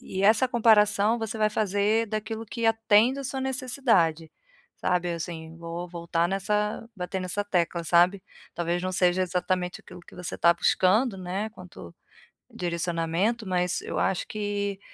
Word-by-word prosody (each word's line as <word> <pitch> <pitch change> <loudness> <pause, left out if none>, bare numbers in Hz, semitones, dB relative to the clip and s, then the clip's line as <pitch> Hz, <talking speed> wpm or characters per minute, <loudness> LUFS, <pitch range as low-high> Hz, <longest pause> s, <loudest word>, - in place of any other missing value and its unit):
e 190 +1 -5
essa 220 +5 +4
comparação 220 -1 +4
você 225 -1 -4
vai 215 0 +2
fazer 210 +2 +1
daquilo 220 +1 -4
que 230 +2 -2
atende 225 +3 +3
a 275 - -7
sua 265 +1 -3
necessidade, 245 - +1 0.5
sabe 175 -1 0
assim, 165 -1 -6
vou 170 +1 -6
voltar 170 0 -1
nessa 210 +3 -1
bater 185 +1 -4
nessa 185 +3 -2
tecla, 170 -3 -1
sabe, 180 +3 +3 0.3
talvez 175 +1 -1
não 185 - -1
seja 180 0 +2
exatamente 180 0 -2
aquilo 180 -1 -13
que - - -17
você 180 -1 -5
tá 170 - +5
buscando, 195 +6 +2
né, 185 +4 -3
quanto 180 - -12 0.6
direcionamento, 175 +5 -1
mas 180 -1 0
eu - - -4
acho 190 -2 0
que 205 -2 -3
190 Hz, 150 wpm, -26 LUFS, 175-215 Hz, 0.6 s, tá